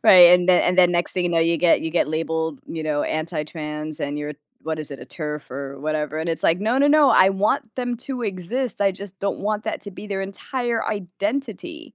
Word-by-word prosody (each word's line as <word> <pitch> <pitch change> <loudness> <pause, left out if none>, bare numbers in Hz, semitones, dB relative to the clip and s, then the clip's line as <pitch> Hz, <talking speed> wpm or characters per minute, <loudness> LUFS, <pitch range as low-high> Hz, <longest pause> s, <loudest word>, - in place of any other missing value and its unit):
right, 180 -2 +9
and 180 0 +1
then 180 - +6
and 180 +1 +1
then 175 -1 +6
next 175 0 +1
thing 180 - +1
you 175 - 0
know, 170 - +2
you 165 +1 +3
get 170 0 +4
you 160 - -3
get 170 - +1
labeled, 160 -1 -2
you 160 - -5
know, 150 -1 0
anti-trans, 155 -1 -4
and 145 +1 -2
you're 150 0 -5 0.3
what 160 0 -3
is 150 - -4
it? 140 - -7
A - - -10
TERF 150 -3 -6
or 135 +1 -6
whatever, 155 0 -2
and 160 +2 -3
it's 165 - -1
like, 165 +3 +3
"No, 225 +5 +1
no, 285 - +4
no. 290 -2 +5
I 190 -4 +6
want 205 +3 0
them 245 -1 -2
to 255 -1 -5
exist, 210 +6 -3
I 195 -1 +3
just 195 0 -9
don't 200 0 -2
want 210 +1 -2
that 220 - -3
to 200 - -7
be 200 +2 -10
their 195 -1 -3
entire 235 +4 -3
identity." 270 - -4
180 Hz, 235 wpm, -22 LUFS, 155-210 Hz, 0.3 s, right